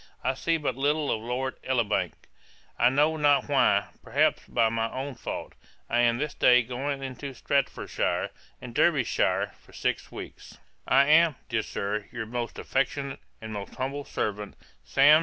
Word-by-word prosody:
I 130 Hz, -, +1 dB
see 165 Hz, +5 st, 0 dB
but 150 Hz, -, -2 dB
little 145 Hz, +2 st, +1 dB
of 110 Hz, -, -1 dB
Lord 125 Hz, +3 st, -3 dB
Elibank, 120 Hz, -5 st, 0 dB, 0.7 s
I 120 Hz, -, +6 dB
know 150 Hz, +4 st, +2 dB
not 145 Hz, -2 st, +3 dB
why; 130 Hz, -8 st, +3 dB
perhaps -, -, +2 dB
by 115 Hz, -2 st, +3 dB
my 115 Hz, 0 st, -1 dB
own 135 Hz, +2 st, -4 dB
fault. 120 Hz, -, -6 dB, 0.4 s
I 120 Hz, -, +3 dB
am 120 Hz, -1 st, +4 dB
this 150 Hz, +2 st, -2 dB
day 125 Hz, 0 st, +5 dB
going 135 Hz, +3 st, -3 dB
into 135 Hz, +1 st, -6 dB
Staffordshire 140 Hz, +2 st, -1 dB, 0.3 s
and -, -, -9 dB
Derbyshire -, -, +2 dB
for -, -, -21 dB
six -, -, -2 dB
weeks. -, -, -10 dB, 0.3 s
'I 135 Hz, +2 st, +5 dB
am, 155 Hz, +1 st, +5 dB
dear 115 Hz, -2 st, +1 dB
Sir, 105 Hz, 0 st, -3 dB
'Your 120 Hz, -2 st, -4 dB
most 120 Hz, +1 st, -4 dB
affectionate, 135 Hz, 0 st, -1 dB, 0.2 s
'And 110 Hz, 0 st, -6 dB
most 100 Hz, -1 st, -6 dB
humble 135 Hz, +2 st, -3 dB
servant, 105 Hz, -5 st, -3 dB, 0.3 s
'SAM. 145 Hz, +3 st, +6 dB
130 Hz, 160 wpm, -27 LUFS, 115-140 Hz, 0.7 s, I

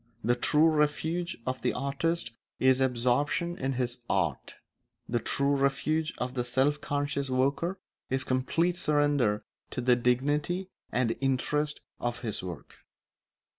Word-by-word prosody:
The 120 Hz, -, +3 dB
true 150 Hz, +5 st, +4 dB
refuge 160 Hz, +3 st, 0 dB
of 130 Hz, 0 st, -2 dB
the -, -, +1 dB
artist 140 Hz, 0 st, -1 dB, 0.3 s
is 130 Hz, 0 st, +4 dB
absorption 130 Hz, +7 st, +1 dB
in 135 Hz, -4 st, -2 dB
his 125 Hz, -1 st, -1 dB
art; -, -, -1 dB, 0.5 s
the 120 Hz, -, 0 dB
true 140 Hz, +4 st, +2 dB
refuge 150 Hz, +3 st, +1 dB
of 125 Hz, +1 st, -3 dB
the 125 Hz, -2 st, -1 dB
self 135 Hz, +4 st, +1 dB
conscious 145 Hz, -1 st, -1 dB
worker 140 Hz, +8 st, +1 dB, 0.3 s
is 130 Hz, 0 st, 0 dB
complete 165 Hz, +7 st, +1 dB
surrender 145 Hz, -, +2 dB, 0.3 s
to -, -, -4 dB
the 125 Hz, 0 st, +4 dB
dignity 145 Hz, +10 st, 0 dB, 0.2 s
and 120 Hz, -2 st, +1 dB
interest 145 Hz, +3 st, 0 dB, 0.2 s
of 120 Hz, 0 st, -2 dB
his 110 Hz, -3 st, -2 dB
work. 90 Hz, -4 st, -8 dB
135 Hz, 135 wpm, -29 LUFS, 125-150 Hz, 0.5 s, true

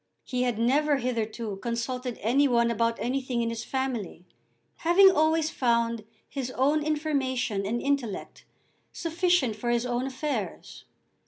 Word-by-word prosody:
He 250 Hz, -1 st, -2 dB
had 245 Hz, -3 st, 0 dB
never 280 Hz, +5 st, +3 dB
hitherto 225 Hz, -4 st, -3 dB
consulted 240 Hz, +3 st, -3 dB
any 270 Hz, +6 st, +4 dB
one 235 Hz, -2 st, +3 dB
about 230 Hz, +1 st, +1 dB
anything 255 Hz, -1 st, -1 dB
in 230 Hz, -, -1 dB
his 230 Hz, 0 st, -4 dB
family, 245 Hz, -10 st, -3 dB, 0.5 s
having 380 Hz, +4 st, +6 dB
always 315 Hz, -1 st, +2 dB
found 235 Hz, -3 st, +1 dB, 0.2 s
his 265 Hz, -3 st, -4 dB
own 290 Hz, +4 st, +3 dB
information 265 Hz, -9 st, -1 dB
and 235 Hz, +3 st, -1 dB
intellect 275 Hz, -7 st, -2 dB, 0.5 s
sufficient 335 Hz, -, +1 dB
for 240 Hz, +3 st, -3 dB
his 240 Hz, 0 st, +1 dB
own 245 Hz, +1 st, -1 dB
affairs. 280 Hz, +2 st, -4 dB
250 Hz, 135 wpm, -27 LUFS, 235-285 Hz, 0.5 s, having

